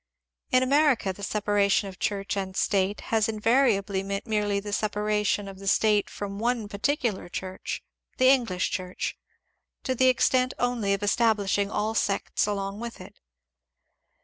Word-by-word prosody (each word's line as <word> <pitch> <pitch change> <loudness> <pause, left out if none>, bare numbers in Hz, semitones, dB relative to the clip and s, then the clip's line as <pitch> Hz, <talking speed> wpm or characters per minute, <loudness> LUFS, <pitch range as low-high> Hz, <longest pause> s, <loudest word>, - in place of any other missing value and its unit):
In 255 0 +4
America 275 -7 +3
the 200 - -13
separation 205 -1 +1
of 185 -2 -10
Church 200 0 -2
and 190 -1 -4
State 195 0 +1
has 220 0 +3
in 215 -1 -4
variably 210 -5 +2
meant 195 +1 -4
merely 210 -2 0
the 205 0 -6
separation 210 -1 0
of 195 -1 -9
the 195 - -8
State 210 +1 +3
from 200 0 -6
one 235 -1 0
particular 215 -2 -1
Church, 185 +1 -5 0.2
— - - -45
the 255 - +4
English 235 -9 +2
Church, 185 -1 -3 0.4
— - - -53
to 260 - 0
the 260 +1 +3
extent 255 0 +2
only 235 -5 +1
of 200 - -7
establishing 205 -2 +2
all 215 +1 -1
sects 205 -1 0
along 200 0 -3
with 235 0 -6
it. - - -13
205 Hz, 160 wpm, -26 LUFS, 200-230 Hz, 0.4 s, In